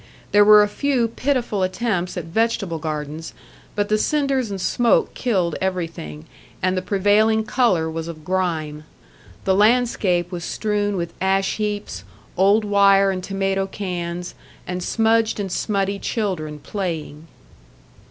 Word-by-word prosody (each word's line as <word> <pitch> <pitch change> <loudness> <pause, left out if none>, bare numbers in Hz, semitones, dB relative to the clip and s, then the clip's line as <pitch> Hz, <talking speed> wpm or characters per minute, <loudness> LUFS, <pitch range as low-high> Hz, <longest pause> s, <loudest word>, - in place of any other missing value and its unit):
There 205 0 +6
were 210 0 +8
a - - +1
few 250 +1 0
pitiful 245 -5 -1
attempts 185 -1 -1
at 175 - -3
vegetable 195 -2 -1
gardens, 155 0 -5 0.4
but 205 0 0
the 215 0 +1
cinders 275 -3 0
and 195 -1 -4
smoke 235 +5 +2
killed 185 -9 0
everything, 165 - -4 0.3
and 185 0 0
the 185 - -1
prevailing 205 +3 +2
colour 215 -9 +1
was 160 0 -4
of 155 -2 -9
grime. 160 -5 -2 0.6
The 190 - +3
landscape 205 -5 +2
was 175 -2 -5
strewn 205 0 -1
with 170 -1 -4
ash 195 0 +1
heaps, 205 - -3 0.3
old 200 +4 +3
wire 200 -1 +4
and 185 -1 -4
tomato 195 0 -1
cans, 180 -3 -5 0.3
and 180 0 -4
smudged 225 +2 +1
and 195 -2 -3
smutty 200 -1 -1
children 180 -11 -3
playing. 160 -3 -5
195 Hz, 135 wpm, -21 LUFS, 175-215 Hz, 0.6 s, were